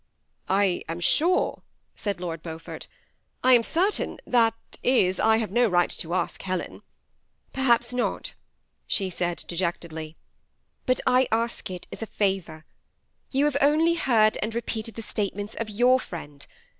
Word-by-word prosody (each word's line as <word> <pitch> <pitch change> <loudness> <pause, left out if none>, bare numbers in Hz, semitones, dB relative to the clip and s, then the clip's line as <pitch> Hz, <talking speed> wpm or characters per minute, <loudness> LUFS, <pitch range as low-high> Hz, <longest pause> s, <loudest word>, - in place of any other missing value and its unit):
'^ - - -46 0.5
I 195 -2 +2
am 165 +1 -3
sore," 340 - +2 0.3
said 200 -4 -3
Lord 165 -3 -4
Beaufort, 160 -1 -7 0.2
— - - -42
" - - -45
I 255 - +6
am 240 - +7
certain, 360 - 0
— - - -42
that 225 -1 +5 0.3
is, 190 -8 +3
I 220 0 +4
have 220 -4 -2
no 240 +3 +4
right 175 -3 +2
to 170 +2 -3
ask - - -2
Helen." 185 -1 -3
^ - - -28 0.7
Perhaps 240 -2 +2
not," 250 -1 -1 0.5
she 190 -2 0
said, 175 0 -2
dejectedlj; 170 -3 -3 0.7
but 255 -1 +2
I 255 0 +4
ask 230 -1 -1
it 180 -1 -7
as - - -8
a 225 - -3
favor. 190 -7 -2 0.6
You 275 +2 +2
have 295 -2 +2
only 310 +4 +4
heard 225 -9 +3
and 220 +1 -2
repeated 225 -2 -3
the 225 - -6
state 205 -3 -2
ments 205 +1 -5
of 230 - -4
ycmr 245 +5 +3
friend. 145 - -9
215 Hz, 170 wpm, -26 LUFS, 180-245 Hz, 0.7 s, am